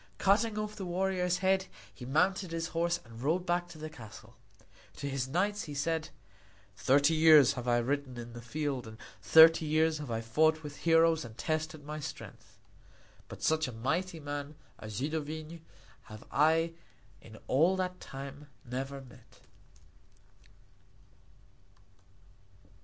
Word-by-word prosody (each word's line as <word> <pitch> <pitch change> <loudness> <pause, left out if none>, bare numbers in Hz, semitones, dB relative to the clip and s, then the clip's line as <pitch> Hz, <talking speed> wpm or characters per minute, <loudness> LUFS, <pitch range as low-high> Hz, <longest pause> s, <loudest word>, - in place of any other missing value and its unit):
Cutting 210 +2 +2
off 215 0 -3
the 195 - -6
warrior's 180 0 0
head, 190 0 +2 0.3
he 125 +5 -10
mounted 185 +6 +1
his 165 0 -3
horse 170 +1 0
and 115 0 -12
rode 165 +7 0
back 175 0 0
to 170 -2 -12
the 155 0 -6
castle. 110 -5 -13 0.6
To 140 - -5
his 135 -2 -2
knights 200 +8 -1
he 145 -3 -7
said: 160 +2 -1 0.7
"Thirty 140 +8 +3
years 155 -4 +7
have 125 -2 -6
I 120 0 +3
ridden 130 +1 -2
in 120 0 -8
the 120 - -8
field 135 0 -3
and 110 0 -10 0.2
thirty 160 0 +7
years 155 +1 +2
have 145 -4 -7
I 115 -1 -2
fought 155 +7 +2
with 145 -1 -8
heroes 165 -1 +3
and 115 -1 -11
tested 155 -1 -3
my 150 +1 -5
strength; 150 0 -9 0.7
but - - -10
such 160 -1 +2
a - - -5
mighty 165 +10 -2
man 145 0 -6 0.2
as 110 -1 -8
Zidovin 155 +4 -4 0.4
have 110 0 -11
I 160 +3 +3 0.5
in 110 -1 -13
all 165 +8 +3
that 180 -1 -3
time 140 +2 -9 0.2
never 135 +3 -5
met." 125 -2 -18
155 Hz, 145 wpm, -31 LUFS, 135-165 Hz, 0.7 s, years